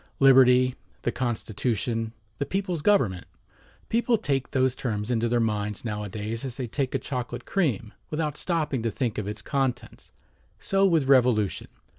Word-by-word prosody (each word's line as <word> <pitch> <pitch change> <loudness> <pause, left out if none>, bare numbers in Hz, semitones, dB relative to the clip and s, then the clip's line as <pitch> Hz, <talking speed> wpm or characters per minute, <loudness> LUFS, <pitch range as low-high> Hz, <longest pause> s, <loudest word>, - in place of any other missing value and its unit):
"Liberty," 130 -2 +6 0.3
"The 120 - +1
Constitution," 115 -1 -2 0.3
"The 140 - 0
People's 190 -4 -2
Government," 125 - +2 0.6
people 235 +1 +2
take 135 -8 -1
those 130 -2 +1
terms 110 -3 -3
into 115 -1 +1
their 120 0 +2
minds 105 -1 -1
nowadays 105 +1 -4
as 130 -3 -5
they 130 - -2
take 130 +3 -2
a - - +4
chocolate 125 -2 -5
cream, 130 - -1 0.2
without 155 -1 -2
stopping 150 -7 -1
to 115 - 0
think 120 -2 -2
of 105 - -4
its 105 - -5
contents. 125 -4 -2 0.5
So 195 0 +2
with 160 -7 +2
"Revolution." 125 -7 +3
125 Hz, 150 wpm, -26 LUFS, 115-140 Hz, 0.6 s, Liberty